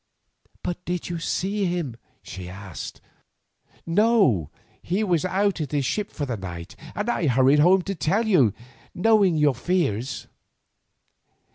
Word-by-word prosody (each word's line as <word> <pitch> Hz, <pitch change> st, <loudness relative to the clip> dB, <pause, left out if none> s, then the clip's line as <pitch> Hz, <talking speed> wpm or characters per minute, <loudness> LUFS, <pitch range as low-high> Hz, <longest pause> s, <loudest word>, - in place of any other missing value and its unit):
"But 180 Hz, 0 st, -4 dB
did 180 Hz, 0 st, -3 dB
you 170 Hz, -1 st, -3 dB
see 195 Hz, +4 st, -1 dB
him?" 175 Hz, -9 st, -2 dB, 0.3 s
she 90 Hz, -1 st, -8 dB
asked. 95 Hz, -2 st, -8 dB, 0.8 s
"No, 170 Hz, -, +3 dB, 0.3 s
he 190 Hz, +5 st, -1 dB
was 180 Hz, -5 st, +1 dB
out 195 Hz, -1 st, +1 dB
at 150 Hz, -1 st, -4 dB
his 140 Hz, -2 st, +1 dB
ship 210 Hz, +9 st, -1 dB
for 145 Hz, -, -3 dB
the 120 Hz, -4 st, -3 dB
night, 90 Hz, -2 st, -7 dB, 0.2 s
and 210 Hz, -, -2 dB
I 180 Hz, -9 st, +1 dB
hurried 130 Hz, +3 st, +4 dB
home 180 Hz, +4 st, +5 dB
to 195 Hz, -, -3 dB
tell 195 Hz, +7 st, 0 dB
you, 150 Hz, -, +4 dB, 0.4 s
knowing 200 Hz, -3 st, +4 dB
your 150 Hz, -2 st, +4 dB
fears." 130 Hz, -, -1 dB
170 Hz, 140 wpm, -24 LUFS, 130-195 Hz, 0.8 s, home